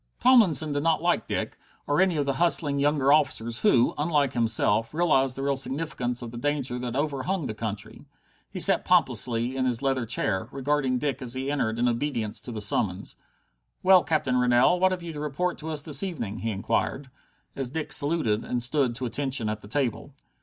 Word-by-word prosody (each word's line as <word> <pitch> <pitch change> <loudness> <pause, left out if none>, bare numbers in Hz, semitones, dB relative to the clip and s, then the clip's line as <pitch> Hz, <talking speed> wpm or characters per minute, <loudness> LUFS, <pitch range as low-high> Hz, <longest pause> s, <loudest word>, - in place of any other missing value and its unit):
Tomlinson 185 - +4
did 145 0 -1
not 165 +1 +1
like 175 0 +1
Dick, - - -4 0.3
or 145 +5 +1
any 185 -4 +2
of 145 - 0
the 140 - 0
hustling 150 -4 +2
younger 145 -1 +3
officers 130 -6 +1
who, 130 - +3
unlike 150 -3 +1
himself, 115 +1 +1
realized 135 -6 +2
the 135 - -5
real 140 0 +1
significance 130 -3 -3
of 115 - -7
the 120 - -7
danger 140 -3 -2
that 125 -1 -4
overhung 150 +4 -2
the 110 - -4
country. 105 -2 -6 0.4
He - - -7
sat - - +5
pompously 120 +1 +1
in 130 -1 0
his 125 0 -1
leather 130 -3 0
chair, 105 -4 -1
regarding 135 -1 0
Dick 140 +1 -3
as 125 -1 -4
he 135 +2 -3
entered 115 -6 -1
in 120 +1 +1
obedience 120 -3 -2
to 125 - -7
the 110 -2 -4
summons. 100 -2 -1 0.7
"Well, 185 -1 +6
Captain 140 -5 0
Rennell, 125 +8 +3
what 185 +1 +3
have 180 -2 -4
you 170 -1 -6
to 150 - -7
report 150 +5 -2
to 160 - -6
us 150 -2 -3
this 145 -3 +2
evening?" 145 - -4
he 115 - -3
inquired, 130 +6 -2 0.4
as 135 -3 -3
Dick 155 +4 -3
saluted 145 -7 +1
and 120 -1 -2
stood 125 -2 0
to 125 +2 -3
attention 130 -3 -2
at 105 0 -4
the 100 - -12
table. 130 +2 -3
135 Hz, 195 wpm, -26 LUFS, 120-150 Hz, 0.7 s, Well